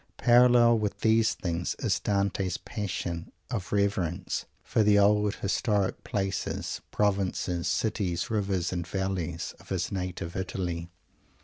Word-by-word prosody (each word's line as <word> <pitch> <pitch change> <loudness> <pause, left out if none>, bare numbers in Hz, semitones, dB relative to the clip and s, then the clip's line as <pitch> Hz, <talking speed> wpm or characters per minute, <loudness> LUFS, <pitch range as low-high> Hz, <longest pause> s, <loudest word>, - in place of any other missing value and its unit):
Parallel 120 -1 +6
with 105 -1 -3
these 110 0 +3
things 85 -2 -2
is - - 0
Dante's 100 -2 0
passion 95 -6 -4 0.2
of 105 -7 -3
reverence 95 -3 0 0.2
for - - +1
the 105 -1 +5
old 105 +1 +4
historic 100 0 0
places 95 -1 -2
provinces, 95 -4 0
cities, 95 -6 -1
rivers 95 -5 0
and 85 -1 -3
valleys 90 -3 -2
of - - -17
his 90 -2 -1
native 90 -2 -4
Italy. 90 -3 -3
95 Hz, 120 wpm, -28 LUFS, 90-105 Hz, 0.2 s, Parallel